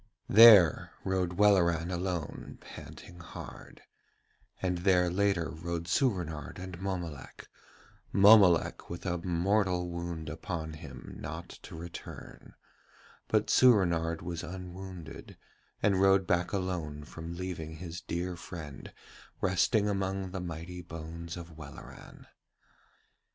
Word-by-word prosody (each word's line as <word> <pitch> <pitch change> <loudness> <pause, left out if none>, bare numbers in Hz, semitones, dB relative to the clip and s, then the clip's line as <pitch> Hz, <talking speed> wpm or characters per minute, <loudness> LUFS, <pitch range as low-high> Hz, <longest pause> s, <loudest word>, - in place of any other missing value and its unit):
There 105 -7 +8
rode 95 -2 0
Welleran 90 -4 +4
alone, 90 -3 -4
panting 90 - -11
hard; 85 - -10 0.8
and 90 -2 -1
there 90 -1 +3
later 95 -3 +1
rode 85 +1 -4
Soorenard 90 - -1
and 95 -1 -7
Mommolek, 90 -8 -5 0.6
Mommolek 100 -4 +6
with 85 +2 -7
a 90 -1 -1
mortal 90 +1 +1
wound 85 -2 -5
upon 80 0 -5
him 80 -3 -10
not - - -6
to - - -10
return, 85 +1 -10 0.7
but - - +1
Soorenard 85 -9 +4
was 85 -1 -4
unwounded 90 -2 -8 0.5
and 95 -2 +3
rode 95 0 +5
back 90 0 +1
alone 90 -6 -3
from 80 +3 -8
leaving 85 -3 -5
his 85 +1 -7
dear 90 +1 -3
friend 80 -5 -9 0.5
resting 95 +3 +2
among 95 -1 -2
the 95 -1 -4
mighty 85 +1 -6
bones 85 0 -7
of 85 -2 -10
Welleran. 70 -3 -11
90 Hz, 110 wpm, -30 LUFS, 85-95 Hz, 0.8 s, There